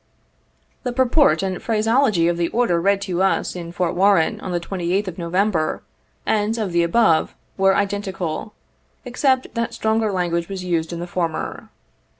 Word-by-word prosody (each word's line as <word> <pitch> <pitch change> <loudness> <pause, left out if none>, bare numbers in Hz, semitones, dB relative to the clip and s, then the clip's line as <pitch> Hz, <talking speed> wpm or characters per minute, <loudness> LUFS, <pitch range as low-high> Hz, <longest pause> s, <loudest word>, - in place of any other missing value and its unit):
The 250 - -3
purport 260 0 +3
and 185 -2 -3
phraseology 220 -4 +2
of 175 0 0
the 170 -1 +1
order 200 -7 +1
read 200 +2 +2
to 185 -2 -2
us 195 -1 +1
in 170 -1 -6
Fort 175 -1 -1
Warren 190 -3 +3
on 185 - -5
the 175 - 0
2Sth 185 +2 -2
of 185 -1 -6
November, 170 -1 0 0.4
and 215 +1 +1
of 210 -5 -2
the 170 0 +2
above 170 -1 +2 0.2
were 195 0 +3
identical, 200 -1 -3 0.5
except 260 +1 0
that 235 0 -2
stronger 220 -1 +1
language 170 -2 -1
was 190 -2 -5
used 170 -2 -1
in 170 0 -5
the - - -3
former. 175 -2 -3
190 Hz, 160 wpm, -21 LUFS, 170-220 Hz, 0.5 s, purport